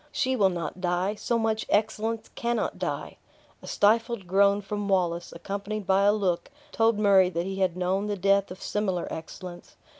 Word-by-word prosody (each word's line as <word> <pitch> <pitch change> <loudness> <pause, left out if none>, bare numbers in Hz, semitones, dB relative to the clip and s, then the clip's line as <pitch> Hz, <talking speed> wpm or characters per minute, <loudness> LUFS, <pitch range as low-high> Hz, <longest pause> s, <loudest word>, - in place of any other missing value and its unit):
"She 260 -3 0
will 200 -5 +4
not 175 0 -5
die 180 +2 0
so 230 +2 -1
much 220 -1 -1
excellence 220 +1 0
cannot 235 0 -2
die." - - -4 0.4
A - - -11
stifled 225 0 +2
groan 200 +2 +3
from 205 0 -4
Wallace, 175 -3 0
accompanied 200 +4 -5
by 195 +1 +3
a 205 - +6
look, 195 -5 -1 0.2
told 225 -1 +2
Murray 195 -3 +5
that 170 -1 -2
he 195 0 -4
had 185 -2 0
known 190 +3 0
the 205 -1 -2
death 195 +1 +2
of 185 +1 -9
similar 190 -4 -1
excellence. 175 +2 -9
200 Hz, 175 wpm, -27 LUFS, 185-215 Hz, 0.4 s, a